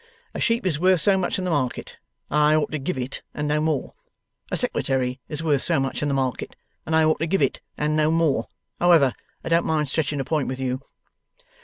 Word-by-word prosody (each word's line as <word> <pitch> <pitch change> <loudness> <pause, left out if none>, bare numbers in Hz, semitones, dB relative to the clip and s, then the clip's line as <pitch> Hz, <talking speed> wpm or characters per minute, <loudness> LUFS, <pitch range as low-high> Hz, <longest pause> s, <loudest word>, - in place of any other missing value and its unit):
A - - -5
sheep 230 -3 +1
is 160 -5 0
worth 185 0 +4
so 195 +5 +3
much 190 -2 0
in 185 - -3
the 180 - -1
market, 130 -5 -2 0.3
and 150 - +2
I 150 +1 +5
ought 155 - 0
to 155 - -2
give 140 +3 -3
it 130 +1 -4
and 150 0 -2
no 150 +1 +1
more. 155 -3 -1 0.6
A - - 0
secretary 130 - 0
is 150 +1 -4
worth 145 -4 +2
so 170 -4 +2
much 135 -1 -2
in 150 - 0
the 140 - 0
market, 130 -3 -2 0.3
and 160 - +1
I 160 - +5
ought 155 0 +2
to 165 - -1
give 195 +4 +2
it - - 0 0.2
and 150 +1 0
no 155 0 +3
more. 160 -8 +1 0.3
However, 165 -8 +5 0.3
I - - -4
don't 165 0 +3
mind 150 -3 0
stretching 145 -1 -1
a - - 0
point 150 0 0
with 130 0 -4
you. 130 0 -2
150 Hz, 230 wpm, -24 LUFS, 135-165 Hz, 0.6 s, I